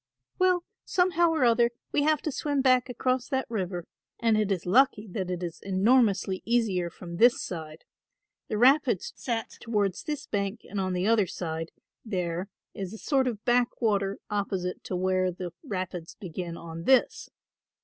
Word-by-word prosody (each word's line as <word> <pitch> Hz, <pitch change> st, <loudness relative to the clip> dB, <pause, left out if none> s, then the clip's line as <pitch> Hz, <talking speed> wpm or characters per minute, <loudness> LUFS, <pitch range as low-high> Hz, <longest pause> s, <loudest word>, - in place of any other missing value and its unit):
"Well, 365 Hz, -1 st, +3 dB, 0.2 s
somehow 345 Hz, -2 st, +3 dB
or 320 Hz, -4 st, +1 dB
other 235 Hz, 0 st, +4 dB, 0.2 s
we 290 Hz, -, +2 dB
have 305 Hz, 0 st, +2 dB
to 310 Hz, -, -1 dB
swim 285 Hz, -1 st, -1 dB
back 255 Hz, -1 st, +4 dB
across 255 Hz, +1 st, 0 dB
that 265 Hz, -2 st, -1 dB
river; 180 Hz, -5 st, -3 dB, 0.3 s
and 225 Hz, -2 st, +3 dB
it 210 Hz, -2 st, +1 dB
is 185 Hz, -3 st, -1 dB
lucky 220 Hz, +1 st, +3 dB
that 185 Hz, -2 st, -3 dB
it 180 Hz, 0 st, -3 dB
is 170 Hz, -2 st, -5 dB
enormously 195 Hz, -1 st, +2 dB
easier 215 Hz, -7 st, +1 dB
from 170 Hz, 0 st, -9 dB
this 240 Hz, +5 st, +5 dB
side. 160 Hz, -3 st, -6 dB, 0.6 s
The 215 Hz, -, -2 dB
rapids 255 Hz, -, +3 dB
set 230 Hz, -3 st, -3 dB
towards 205 Hz, -5 st, 0 dB
this 300 Hz, -3 st, -4 dB
bank 200 Hz, +2 st, -2 dB
and 205 Hz, -, -4 dB
on 185 Hz, -1 st, -1 dB
the 180 Hz, +1 st, 0 dB
other 215 Hz, -3 st, +3 dB
side 165 Hz, -2 st, -4 dB, 0.3 s
there 180 Hz, -3 st, -3 dB, 0.2 s
is 190 Hz, -1 st, -5 dB
a -, -, -8 dB
sort 265 Hz, +1 st, +1 dB
of 220 Hz, -4 st, -4 dB
backwater 225 Hz, -5 st, +1 dB
opposite 195 Hz, -3 st, -2 dB
to 185 Hz, -, -3 dB
where 185 Hz, 0 st, +1 dB
the 175 Hz, -1 st, -6 dB
rapids 185 Hz, -4 st, -5 dB
begin 175 Hz, -3 st, -5 dB
on 165 Hz, 0 st, -8 dB
this. 260 Hz, -2 st, +3 dB
205 Hz, 165 wpm, -28 LUFS, 180-250 Hz, 0.6 s, this